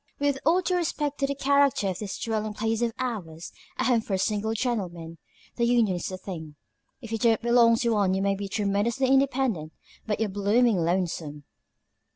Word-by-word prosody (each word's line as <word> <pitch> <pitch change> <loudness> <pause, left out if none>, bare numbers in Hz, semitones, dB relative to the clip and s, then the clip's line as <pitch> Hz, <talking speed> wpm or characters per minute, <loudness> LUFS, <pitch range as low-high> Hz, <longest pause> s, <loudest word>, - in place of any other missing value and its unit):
With 285 -1 0
all 350 +3 +4
due 365 0 0
respect 295 -4 -2
to 275 - +1
the 280 - -2
character 280 -5 +2
of 180 - -4
this 205 -3 -5
dwelling 215 -2 -3
place 225 +1 -1
of 235 -1 +1
ours 180 -10 -5 0.3
a - - 0
home 240 -3 +3
for 195 -3 -2
single 215 +3 -1
gentlemen 175 -9 -3 0.4
the 235 - 0
union 235 -5 +3
is 175 - -4
the 185 - -5
thing. 160 -6 -8 0.5
If 230 -3 -9
you 225 - -2
don't 225 -1 +3
belong 235 -1 +4
to 235 +1 0
one 200 -3 +2
you 190 - -1
may 200 0 +2
be 200 0 -4
tremendously 215 +5 0
independent, 260 - +1 0.3
but 210 -1 -1
you're 220 - +1
blooming 205 +3 +2
lonesome." 165 -4 -2
220 Hz, 190 wpm, -26 LUFS, 190-245 Hz, 0.5 s, all